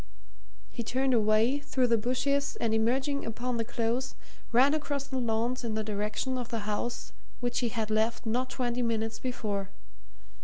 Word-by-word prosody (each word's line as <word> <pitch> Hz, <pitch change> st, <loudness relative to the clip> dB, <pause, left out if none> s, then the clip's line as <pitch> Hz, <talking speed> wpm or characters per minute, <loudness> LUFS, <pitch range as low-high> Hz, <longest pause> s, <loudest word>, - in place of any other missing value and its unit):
He 240 Hz, -, -4 dB
turned 260 Hz, +3 st, +1 dB
away 220 Hz, +4 st, +4 dB
through 265 Hz, -3 st, +1 dB
the 235 Hz, -1 st, +4 dB
bushes 280 Hz, +5 st, +1 dB
and 225 Hz, -1 st, +1 dB
emerging 260 Hz, +6 st, +1 dB
upon 240 Hz, +2 st, -2 dB
the 230 Hz, -, +1 dB
Close 240 Hz, +2 st, -1 dB, 0.4 s
ran 260 Hz, +5 st, +6 dB
across 290 Hz, -2 st, -1 dB
the 265 Hz, -2 st, -2 dB
lawns 235 Hz, +2 st, 0 dB
in 225 Hz, -2 st, -2 dB
the 220 Hz, -, 0 dB
direction 215 Hz, +5 st, -1 dB
of 245 Hz, -, -5 dB
the 230 Hz, -2 st, -2 dB
house 215 Hz, +3 st, -3 dB, 0.3 s
which 245 Hz, 0 st, 0 dB
he 240 Hz, -, +1 dB
had 220 Hz, -1 st, -2 dB
left 220 Hz, +2 st, +1 dB
not 250 Hz, +3 st, 0 dB
twenty 245 Hz, -1 st, -1 dB
minutes 225 Hz, -1 st, 0 dB
before. 210 Hz, -6 st, -2 dB
240 Hz, 165 wpm, -30 LUFS, 220-255 Hz, 0.4 s, ran